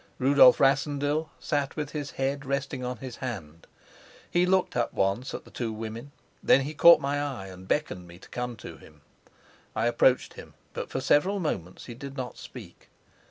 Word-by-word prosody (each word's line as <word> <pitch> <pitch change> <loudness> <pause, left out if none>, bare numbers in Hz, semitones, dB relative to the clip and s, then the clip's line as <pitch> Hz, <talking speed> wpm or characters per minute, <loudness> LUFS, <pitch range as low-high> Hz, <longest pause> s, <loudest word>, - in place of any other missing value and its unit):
Rudolf 130 -1 +6
Rassendyll 145 +2 +1
sat 145 -2 -1
with 150 -2 -4
his 145 -2 -4
head 135 +1 -1
resting 135 -1 -3
on 125 0 -3
his 125 0 -8
hand. 85 - -7 0.6
He 175 +1 +3
looked 190 0 +2
up 120 -1 0
once 100 +8 0
at - - -8
the - - -16
two 115 -3 -3
women; 115 +5 -7 0.3
then 135 - +5
he 145 +3 -4
caught 170 +2 +8
my 145 0 -1
eye, 130 -10 -4
and 95 0 -12
beckoned 95 - -1
me 85 0 -13
to - - -16
come 125 0 -4
to - - -10
him. - - -18 0.7
I 110 - 0
approached 120 +2 +3
him, - - -12 0.2
but - - -5
for - - -3
several 195 +7 +3
moments 95 - -4
he 120 - -8
did 135 +3 -9
not 125 -1 -4
speak. - - -12
135 Hz, 185 wpm, -27 LUFS, 115-145 Hz, 0.7 s, caught